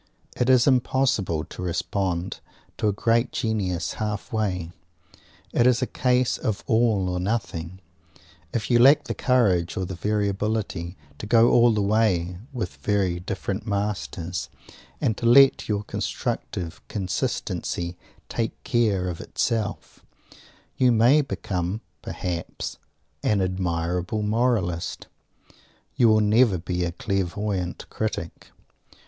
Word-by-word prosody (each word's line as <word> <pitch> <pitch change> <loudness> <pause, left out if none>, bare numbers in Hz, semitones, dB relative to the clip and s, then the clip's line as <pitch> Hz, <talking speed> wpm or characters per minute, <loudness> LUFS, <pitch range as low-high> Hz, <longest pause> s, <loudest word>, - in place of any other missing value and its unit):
It 125 - +1
is 125 -2 +6
impossible 125 - +2
to 80 - -9
respond 90 0 -2 0.4
to - - 0
a - - +4
great 115 +4 +1
genius 100 -6 -1
halfway. 105 -4 -2 0.8
It 120 - +4
is 125 0 +3
a - - +3
case 125 0 +1
of 105 -3 -2
all 110 -4 +2
or 90 0 -1
nothing. 95 -4 -3 0.7
If 115 +2 -2
you 120 - +5
lack 135 +5 +7
the - - -3
courage, 100 - +2
or 95 - -1
the 95 - -5
variability, 100 -2 -1 0.2
to 105 - -6
go 115 +1 +5
all 120 0 +6
the 105 -2 +1
way 95 -4 +1
with 105 - -4
very 95 +3 0
different 95 +3 -4
masters, 100 -4 -3 0.5
and 110 - +1
to 115 - 0
let 135 +1 +6
your 105 -1 0
constructive 85 0 -4
consistency 90 -2 -2 0.3
take 115 -1 -3
care 110 -8 +1
of 85 -2 -4
itself, 110 -4 -3 0.7
you 125 -1 +4
may 120 +6 +5
become, 95 -6 -3 0.2
perhaps, 85 -2 -5 0.4
an 105 +5 +2
admirable 90 +1 -1
moralist; 105 -6 0 0.9
you 120 - +5
will 110 -1 +5
never 105 -1 +4
be 90 +1 -2
a 85 - -1
clairvoyant 100 -2 -2
critic. - - -4
100 Hz, 120 wpm, -25 LUFS, 90-115 Hz, 0.9 s, lack